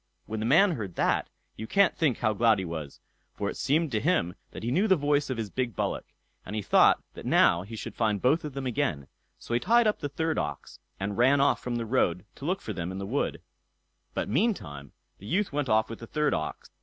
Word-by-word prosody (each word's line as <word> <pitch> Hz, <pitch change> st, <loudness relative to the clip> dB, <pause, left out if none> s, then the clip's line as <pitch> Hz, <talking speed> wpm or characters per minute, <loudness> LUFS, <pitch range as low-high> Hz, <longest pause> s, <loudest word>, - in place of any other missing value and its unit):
When 110 Hz, 0 st, -4 dB
the 110 Hz, -, -1 dB
man 180 Hz, +9 st, +5 dB
heard 105 Hz, -, -5 dB
that, -, -, +1 dB, 0.3 s
you 110 Hz, -, -7 dB
can't 200 Hz, -, +3 dB
think 150 Hz, -7 st, +1 dB
how 110 Hz, -2 st, +1 dB
glad 110 Hz, +1 st, +4 dB
he 95 Hz, -, -3 dB
was, 80 Hz, -4 st, -6 dB, 0.4 s
for 100 Hz, -, -2 dB
it -, -, -9 dB
seemed 150 Hz, +2 st, +1 dB
to 110 Hz, -, +1 dB
him 150 Hz, -, +1 dB, 0.2 s
that -, -, -9 dB
he 120 Hz, -, -1 dB
knew 190 Hz, +11 st, +2 dB
the 190 Hz, -, +5 dB
voice 145 Hz, -2 st, +1 dB
of 130 Hz, -, -2 dB
his 110 Hz, -4 st, -4 dB
big 125 Hz, -5 st, -2 dB
bullock, -, -, -2 dB, 0.4 s
and 105 Hz, -, -6 dB
he 105 Hz, -, -2 dB
thought -, -, +5 dB
that -, -, -10 dB
now 85 Hz, -, +4 dB
he 105 Hz, +5 st, -8 dB
should -, -, -6 dB
find 110 Hz, -3 st, 0 dB
both 150 Hz, -, +2 dB
of 150 Hz, -2 st, -5 dB
them 135 Hz, 0 st, -4 dB
again; 120 Hz, -, -1 dB, 0.3 s
so -, -, -7 dB
he 120 Hz, -, +3 dB
tied 235 Hz, -, +4 dB
up 215 Hz, -, +1 dB
the 145 Hz, -, -3 dB
third 160 Hz, +3 st, -1 dB
ox, 75 Hz, -2 st, -5 dB, 0.2 s
and 100 Hz, +2 st, -3 dB
ran 135 Hz, +4 st, +5 dB
off 140 Hz, -, +3 dB
from 125 Hz, -1 st, -3 dB
the 115 Hz, -1 st, -2 dB
road 100 Hz, -7 st, +1 dB
to 140 Hz, -, -10 dB
look 185 Hz, +4 st, -1 dB
for 110 Hz, -, -5 dB
them 90 Hz, -1 st, -4 dB
in 95 Hz, -, -6 dB
the 100 Hz, -, -4 dB
wood; 130 Hz, +8 st, -2 dB, 0.7 s
but -, -, -1 dB
meantime 95 Hz, -, -1 dB, 0.3 s
the 100 Hz, -, -11 dB
youth 195 Hz, -, 0 dB
went 145 Hz, -3 st, -1 dB
off 110 Hz, +1 st, +3 dB
with 115 Hz, -, -8 dB
the 115 Hz, -, -9 dB
third 150 Hz, +3 st, 0 dB
ox. 75 Hz, -, -4 dB
120 Hz, 245 wpm, -28 LUFS, 100-150 Hz, 0.7 s, man